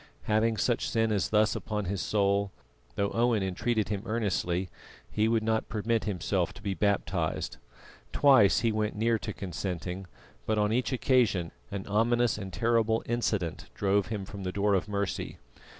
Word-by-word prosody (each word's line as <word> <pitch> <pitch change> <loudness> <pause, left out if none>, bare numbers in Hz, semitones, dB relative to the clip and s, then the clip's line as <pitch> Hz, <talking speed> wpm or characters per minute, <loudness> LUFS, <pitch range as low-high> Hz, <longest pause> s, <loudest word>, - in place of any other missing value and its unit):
Having 110 +1 +2
such 120 +3 0
sin 115 -1 +1
as 100 -3 0
this 105 0 +3
upon 105 -2 -3
his 95 +1 -2
soul, 100 -1 +1 0.4
though 100 0 0
Owen 115 -3 +2
entreated 105 +3 -1
him 100 -2 -2
earnestly, 95 -5 0 0.4
he 110 +1 +2
would 115 -1 +2
not 110 0 0
permit 110 +1 0
himself 95 -2 -1
to - - -12
be 100 - -1
baptised. 100 0 -1 0.5
Twice 130 -8 +5
he 115 -1 +2
went 105 -1 -1
near 115 +1 +1
to 105 - -4
consenting, 90 -1 -5 0.4
but 110 - +1
on 105 +1 +2
each 125 +3 0
occasion 120 -10 +2 0.2
an 100 -1 -5
ominous 115 +1 +2
and 95 -2 -6
terrible 115 +3 +1
incident 110 -8 -1
drove 100 0 +1
him 105 -3 -4
from 100 +1 -8
the 90 -1 -3
door 100 +1 +1
of 95 +1 +1
mercy. 100 -2 -3
105 Hz, 165 wpm, -29 LUFS, 100-115 Hz, 0.5 s, Twice